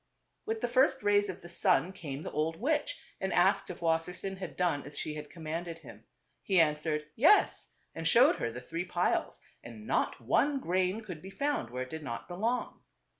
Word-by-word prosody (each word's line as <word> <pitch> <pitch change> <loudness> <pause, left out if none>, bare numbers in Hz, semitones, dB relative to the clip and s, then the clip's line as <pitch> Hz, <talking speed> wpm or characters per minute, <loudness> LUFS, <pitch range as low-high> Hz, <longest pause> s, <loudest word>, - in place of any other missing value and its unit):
With 220 0 -2
the 245 - +1
first 265 +1 +3
rays 205 0 +3
of 185 0 -6
the - - -8
sun 180 +1 +2
came 145 -5 -6
the - - -5
old 155 +2 0
witch 305 - -1 0.2
and - - -2
asked - - +3
if - - -7
Wassersein 170 +4 -1
had 185 -6 -7
done 175 -5 +1
as 145 +1 -10
she 155 - -3
had 150 -1 -7
commanded 165 +1 -5
him. 115 -8 -14 0.4
He 190 -3 +2
answered 150 -1 +1
"Yes," 330 - +4 0.2
and 165 0 -2
showed 245 - +6
her 115 - -2
the 125 +2 -7
three 165 +7 -4
piles; 180 -1 -1 0.2
and 110 -2 -10
not - - 0
one 275 - +2
grain 185 +1 0
could 180 -8 -8
be 190 - -9
found 280 - -1
where 125 +1 -3
it 130 - -11
did 160 - -5
not 120 -6 -6
belong. 225 +8 -2
175 Hz, 195 wpm, -31 LUFS, 150-205 Hz, 0.4 s, showed